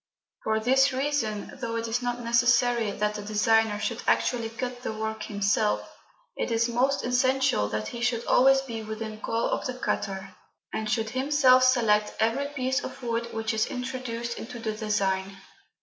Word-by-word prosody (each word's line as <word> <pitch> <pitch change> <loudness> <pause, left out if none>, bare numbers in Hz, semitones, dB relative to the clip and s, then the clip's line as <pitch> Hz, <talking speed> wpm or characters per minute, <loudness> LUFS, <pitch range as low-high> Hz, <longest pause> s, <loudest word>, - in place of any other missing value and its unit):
For 220 0 +1
this 265 +4 +4
reason, 255 -6 -1
though 230 -2 -3
it 230 0 -2
is 230 +2 -1
not 245 0 -2
necessary 235 -1 +3
that 210 +1 -1
the 210 - -5
designer 215 +1 +2
should 230 +2 -2
actually 235 -3 +1
cut 245 +1 -5
the 250 - -3
work 220 0 -4
himself, 205 +1 0 0.5
it - - -2
is 230 0 +2
most 255 +4 +1
essential 255 - +2
that 110 0 -3
he 235 - -7
should 240 -1 0
always 270 +1 +5
be 230 -4 -6
within 220 0 -6
call 230 +1 -1
of - - -1
the 255 - -4
cutter, 195 -6 -3 0.4
and 220 -1 -2
should 220 0 0
himself 260 -1 +4
select 225 -5 +3
every 230 +6 +1
piece 265 -1 -1
of 265 - -8
wood 235 0 -1
which 225 +1 -2
is 220 0 +1
introduced 250 -2 -4
into 235 - -7
the 225 -1 -3
design. 195 -3 -1
230 Hz, 170 wpm, -27 LUFS, 220-255 Hz, 0.5 s, always